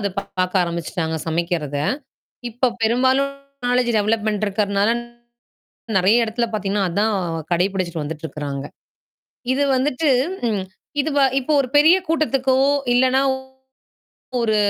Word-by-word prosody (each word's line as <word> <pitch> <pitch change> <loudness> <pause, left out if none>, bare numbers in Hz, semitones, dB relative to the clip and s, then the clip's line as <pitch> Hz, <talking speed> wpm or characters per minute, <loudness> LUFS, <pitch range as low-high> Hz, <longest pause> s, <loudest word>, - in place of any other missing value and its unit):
அதப் 200 -1 -3
பார்க்க 185 -1 0
ஆரம்பிச்சுட்டாங்க 170 -1 -3
சமைக்கிறத. 165 -3 -1 0.7
இப்ப 245 +2 0
பெரும்பாலும் 260 +4 +2 0.4
நாலெட்ஜ் 245 -1 +2
டெவலப்மென்ட் 215 0 0
இருக்கிறனால 200 +1 +1 1.1
நிறைய 220 +6 +4
எடத்துல 235 +2 -1
பாத்தீங்கன்னா, 200 -1 0
அதான் 205 +4 +1 0.4
கடைப்பிடிச்சுட்டு 180 -3 -1
வந்துட்டு 155 +1 -6
இருக்காங்க. 140 -2 -5 0.9
இது 285 - +1
வந்துட்டு, 280 +2 +1 0.4
ம். 200 -3 -1 0.4
இது 305 +2 -1
வ - - +4 0.2
இப்போ 300 +4 -2
ஒரு 255 - -2
பெரிய 320 +5 +7
கூட்டத்துக்கோ! 270 -5 +1 0.4
இல்லன்னா 260 +1 +3 1.2
ஒரு 220 -2 +1
210 Hz, 110 wpm, -21 LUFS, 180-255 Hz, 1.2 s, பெரிய